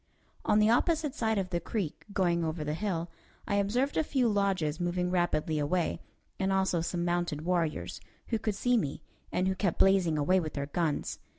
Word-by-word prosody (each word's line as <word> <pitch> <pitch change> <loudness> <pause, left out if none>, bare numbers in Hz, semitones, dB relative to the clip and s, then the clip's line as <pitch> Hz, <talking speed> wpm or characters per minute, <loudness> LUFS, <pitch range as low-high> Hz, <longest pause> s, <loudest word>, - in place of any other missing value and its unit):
On 210 - +4
the 215 +1 +5
opposite 305 +3 +2
side 220 -6 0
of 185 -2 -2
the 175 - 0
creek, 170 -2 -4
going 175 -4 +1
over 160 -1 -2
the 150 0 -2
hill, 170 -2 -2 0.4
I 200 - +1
observed 240 +8 +1
a 315 - +3
few 265 -5 +1
lodges 195 -7 +1
moving 180 0 0
rapidly 160 -3 +1
away, 165 +4 0 0.4
and 190 0 +1
also 190 -3 +2
some 170 +1 -2
mounted 175 -3 -1
warriors, 170 -3 -1 0.3
who 225 - 0
could 215 -2 -1
see 245 +4 +2
me, 145 -11 -2 0.3
and 185 - +1
who 190 - +2
kept 190 -2 -1
blazing 190 -5 +4
away 180 +6 +3
with 155 -3 -4
their 140 -1 -2
guns. 155 0 -1
180 Hz, 190 wpm, -30 LUFS, 165-205 Hz, 0.4 s, the